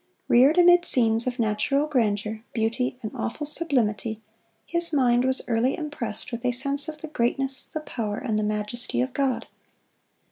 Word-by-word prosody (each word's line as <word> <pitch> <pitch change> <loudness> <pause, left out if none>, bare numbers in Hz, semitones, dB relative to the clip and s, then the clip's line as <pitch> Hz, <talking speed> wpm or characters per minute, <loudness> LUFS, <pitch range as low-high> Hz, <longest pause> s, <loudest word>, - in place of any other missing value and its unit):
Reared 270 +7 +5
amid 350 0 +7
scenes 230 -5 +3
of 250 0 -2
natural 235 +6 +1
grandeur, 220 -6 0
beauty, 235 +3 -1
and 215 - -4
awful 295 +6 -4
sublimity, 235 -9 -1 0.5
his 340 -1 +2
mind 250 -4 +3
was 260 0 0
early 240 +3 +1
impressed 265 -9 -5
with 235 -1 -5
a 250 - +2
sense 275 +5 -2
of 305 -1 -9
the 315 - -6
greatness, 270 -1 -1
the 310 - -5
power, 215 -8 -4
and 215 -2 -1
the - - 0
majesty 210 +3 -2
of 255 0 -1
God. 270 -3 0
250 Hz, 165 wpm, -25 LUFS, 225-285 Hz, 0.5 s, amid